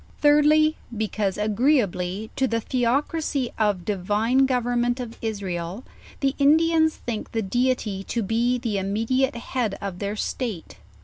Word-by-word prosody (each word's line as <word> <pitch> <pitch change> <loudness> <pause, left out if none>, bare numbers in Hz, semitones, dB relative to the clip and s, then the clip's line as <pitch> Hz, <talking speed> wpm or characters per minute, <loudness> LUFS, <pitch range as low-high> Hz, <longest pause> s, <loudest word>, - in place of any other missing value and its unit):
Thirdly, 300 +1 +4 0.2
because, 210 -2 -1
agreeably 210 - +1
to 265 - +1
the 230 -2 0
theocracy 260 +3 0
of 205 -5 +1
divine 215 +7 +2
government 245 -1 0
of 235 -2 -6
Israel, 195 -2 -4 0.4
the 270 -1 +2
Indians 315 +2 +4
think 230 -3 -5
the 225 -1 0
Deity 225 -2 0
to 235 - -2
be 235 +4 +1
the 230 -5 -2
immediate 225 +7 0
head 235 -3 -2
of 195 -3 -5
their 205 0 -2
state. 215 -4 -4
230 Hz, 130 wpm, -24 LUFS, 205-265 Hz, 0.4 s, Thirdly